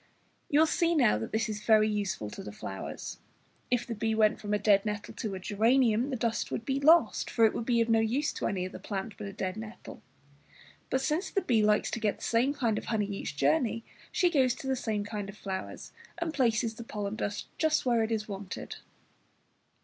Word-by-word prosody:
You 310 0 +5
see 335 +1 +1
now 105 - +4
that 110 - -5
this 220 0 0
is 210 -1 -5
very 215 -1 +5
useful 200 - -2
to - - -7
the 105 - -7
flowers. 95 -2 -6 0.5
If 245 -1 +1
the 235 - -4
bee 220 0 -1
went 215 -1 +3
from 205 - -4
a 210 - +3
dead 205 -1 +4
nettle 210 -1 -4
to 215 -5 -4
a - - -5
geranium, 225 +5 +2
the 265 - -1
dust 230 -1 -1
would 225 - -4
be 270 +1 0
lost, 320 +4 +4
for 230 - +4
it 220 - +3
would 230 - -4
be 235 -2 +3
of 230 - +1
no 225 -1 +4
use 245 +7 0
to - - -2
any 185 -2 -1
other - - -9
plant 200 +1 -5
but 205 - -7
a - - -6
dead 190 -1 -4
nettle. 220 +1 -9 0.9
But 265 - +1
since 310 +7 0
the 390 - 0
bee 230 -4 +3
likes 210 0 +2
to 230 - -2
get 210 -2 0
the - - -12
same 240 +4 +2
kind 230 -7 +1
of - - -11
honey 215 -2 0
each 200 -7 -5
journey, 160 - +2 0.3
she 355 -2 +2
goes 260 -6 +3
to 270 - -10
the 265 - +1
same 220 -4 -2
kind 205 -1 -5
of 200 - -10
flowers, 190 -2 -6 0.3
and 340 -2 -2
places 230 -4 +1
the 235 - -8
pollen 210 -2 -4
dust 205 -2 -3
just 315 -3 +2
where 240 -2 +3
it 220 +1 -1
is 215 -1 -1
wanted. 195 -2 -6
220 Hz, 225 wpm, -30 LUFS, 205-250 Hz, 0.9 s, You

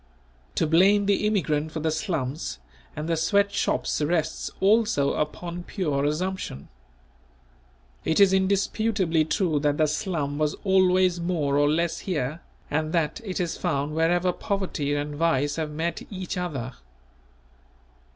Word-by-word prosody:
To - - +2
blame 195 +6 +4
the 205 +1 +2
immigrant 160 -7 0
for 160 - -4
the 160 +1 0
slums 150 - -3 0.4
and 150 +1 -4
the 165 - +1
sweat 200 +5 +2
shops - - 0
rests 155 +1 0
also 200 -8 +3
upon 170 +3 -3
pure 150 -6 -1
assumption. 155 - -3 1.3
It 160 - +1
is 195 -1 +6
indisputably 190 -3 +1
true 160 -3 +1
that 145 0 +1
the 155 - +4
"slum" 150 -2 -2
was 150 -1 +1
always 185 -2 +3
more 165 -5 0
or 145 0 +4
less 170 +2 0
here 155 -3 -3 0.3
and 155 +1 -1
that 165 +7 0
it 190 -4 -4
is 175 -2 -2
found 140 +2 -1
wherever 175 +3 +2
poverty 175 -9 -2
and 145 0 -3
vice 145 -2 +1
have 160 -2 -2
met 160 +3 -3
each 185 -2 -5
other. 140 -9 -4
165 Hz, 140 wpm, -25 LUFS, 150-185 Hz, 1.3 s, is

